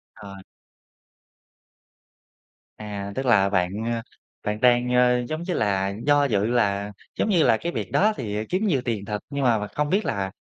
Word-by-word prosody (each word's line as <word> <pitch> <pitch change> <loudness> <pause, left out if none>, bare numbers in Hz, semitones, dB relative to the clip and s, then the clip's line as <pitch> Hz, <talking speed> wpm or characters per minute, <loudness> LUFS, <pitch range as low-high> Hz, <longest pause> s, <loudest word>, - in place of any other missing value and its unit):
Ờ. 100 -1 -10 2.4
À, 100 -2 -6
tức 135 +3 -3
là 100 -5 +4
bạn, 95 +3 0
a, 115 0 -2 0.4
bạn 105 +1 -2
đang, 125 0 +3
a, 125 0 +4
giống 155 +2 -3
như 180 0 -3
là, 100 -1 0
do 145 -1 +4
dự 105 -6 +1
là, 105 -4 0 0.3
giống - - +1
như 180 -6 +3
là, 110 - +4
cái 170 +8 -4
việc - - -5
đó 215 +2 +3
thì 105 -2 -3
kiếm 185 +5 -1
nhiều 140 -10 +1
tiền 110 -5 -2
thật, 105 0 -3
nhưng 140 -1 -2
mà 120 -3 +3
mà 105 - -4
không 150 0 -2
biết 200 +3 +1
là 95 -1 -2
115 Hz, 185 wpm, -24 LUFS, 100-140 Hz, 2.4 s, là